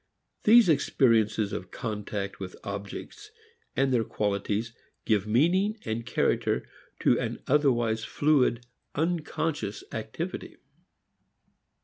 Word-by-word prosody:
These 230 0 +8
experiences 115 -8 +3
of 90 - -5
contact 105 -3 -4
with 95 -2 -6
objects 100 - -7 0.5
and 135 -1 +2
their 115 -2 +3
qualities 105 +2 -1 0.3
give 105 -2 +2
meaning, 175 - +3 0.3
character, - - +1 0.3
to - - +4
an - - -4
otherwise 120 -6 +2
fluid, 130 -5 +2 0.3
unconscious 165 - -1
activity. - - -5
120 Hz, 90 wpm, -28 LUFS, 105-155 Hz, 0.5 s, These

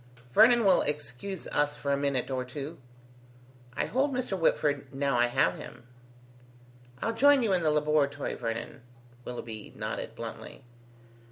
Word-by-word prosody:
"Vernon 235 - +6
will 190 -2 +5
excuse 150 +6 -4
us 145 0 +1
for 140 -1 -3
a - - +3
minute 140 -2 -1
or 130 -1 -1
two." 145 +5 -7 1.0
"I - - 0
hold 270 +4 +1
by 255 - -1
Mr. 240 -6 -2
Whitford 145 -5 +1
now 140 -1 0
I 120 0 +4
have 120 - +2
him." - - -11 1.2
"I'll 230 - 0
join 275 +3 +5
you 210 -4 +2
in 180 - +2
the 160 - +2
laboratory, 150 -1 +1
Vernon," 115 +2 -5 0.4
Willoughby 115 -3 -7
nodded - - -5
bluntly. - - -8
145 Hz, 150 wpm, -29 LUFS, 130-195 Hz, 1.2 s, Vernon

